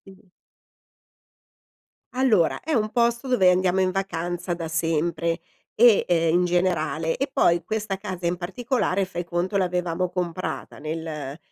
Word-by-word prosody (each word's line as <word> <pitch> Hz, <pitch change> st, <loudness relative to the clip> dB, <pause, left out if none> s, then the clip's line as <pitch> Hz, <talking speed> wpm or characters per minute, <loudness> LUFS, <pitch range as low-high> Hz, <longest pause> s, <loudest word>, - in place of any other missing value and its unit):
Sì. 185 Hz, -1 st, -26 dB, 1.8 s
Allora, 230 Hz, -10 st, +2 dB
è 315 Hz, +1 st, -3 dB
un 215 Hz, -3 st, +1 dB
posto 235 Hz, +2 st, +1 dB
dove 195 Hz, -8 st, +4 dB
andiamo 185 Hz, +1 st, +2 dB
in 185 Hz, 0 st, +2 dB
vacanza 175 Hz, -2 st, -3 dB
da 165 Hz, -1 st, -4 dB
sempre 165 Hz, +1 st, 0 dB, 0.3 s
e 230 Hz, -2 st, +6 dB
uhm, 165 Hz, 0 st, +3 dB
in 180 Hz, -, +2 dB
generale 165 Hz, -2 st, 0 dB
e 275 Hz, +1 st, -1 dB
poi 170 Hz, -9 st, +3 dB
questa 210 Hz, -3 st, -3 dB
casa 185 Hz, -3 st, -6 dB
in 175 Hz, +1 st, -1 dB
particolare, 200 Hz, +1 st, -1 dB
fai 175 Hz, -1 st, -5 dB
conto, 175 Hz, +4 st, -1 dB
l'avevamo 180 Hz, -1 st, -1 dB
comprata 180 Hz, 0 st, -4 dB
nel 155 Hz, -2 st, -5 dB
180 Hz, 135 wpm, -24 LUFS, 170-195 Hz, 1.8 s, e